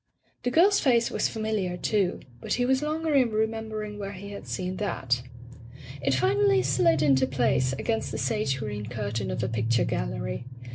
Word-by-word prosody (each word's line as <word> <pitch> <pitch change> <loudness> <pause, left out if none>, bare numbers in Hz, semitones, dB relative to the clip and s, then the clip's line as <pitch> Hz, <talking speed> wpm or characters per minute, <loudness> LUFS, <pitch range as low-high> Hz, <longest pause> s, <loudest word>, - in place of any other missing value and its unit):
The 245 - 0
girl's 380 +9 +5
face 235 -4 +3
was - - 0
familiar, 215 -5 -2
too, 195 -1 0 0.2
but - - -2
he 245 - +1
was 265 +1 +2
longer 310 +1 -1
in 260 -4 +4
remembering 215 -1 -2
where 200 0 -5
he 200 +1 -8
had 200 - -8
seen 185 0 -3
that. 130 -11 -1 0.8
It 135 - +2
finally 130 0 +3
slid 150 +3 +3
into 135 -3 +4
place, 130 0 +1
against 225 - -1
the - - -3
sage 175 -12 0
green 105 -3 -5
curtain 110 -2 -3
of 115 - -2
a - - +1
picture 115 +1 +1
gallery. - - -3
180 Hz, 175 wpm, -27 LUFS, -, 0.8 s, girl's